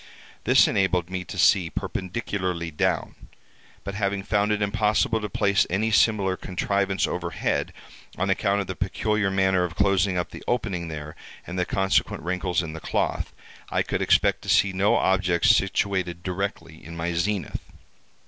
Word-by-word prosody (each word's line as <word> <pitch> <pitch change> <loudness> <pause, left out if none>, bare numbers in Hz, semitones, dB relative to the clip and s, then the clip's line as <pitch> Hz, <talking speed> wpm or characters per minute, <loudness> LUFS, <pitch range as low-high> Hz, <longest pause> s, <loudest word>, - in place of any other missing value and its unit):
This - - +6
enabled 90 -2 +1
me 95 -1 -3
to - - -8
see 90 -4 +4
perpendicularly 90 -4 -3
down, 75 - -1 0.7
but 100 - -5
having 100 -1 -1
found 105 +1 +1
it 105 - +1
impossible 105 +2 +1
to 105 - -4
place 100 +1 +2
any 110 +5 0
similar 105 -4 +3
contrivance 95 +1 -1
overhead, 85 -1 -2 0.5
on 95 - 0
account 100 +1 +1
of - - -4
the 95 - -5
peculiar 105 +2 0
manner 95 -1 +2
of 90 -1 -4
closing 100 -1 +2
up 90 - -2
the - - -10
opening 100 -8 -1
there, 75 -1 -7 0.3
and 90 +1 -5
the 90 - +1
consequent 95 -4 0
wrinkles 90 +1 -1
in 80 -2 -6
the 80 - -6
cloth, - - -1 0.4
I - - +1
could - - -2
expect - - +3
to - - -8
see 100 -1 +4
no 95 +2 +3
objects 95 +2 +3
situated 95 -3 -1
directly 90 -4 -4
in 85 +1 -9
my 85 +1 -2
zenith. 95 +2 -2
95 Hz, 160 wpm, -25 LUFS, 90-100 Hz, 0.7 s, This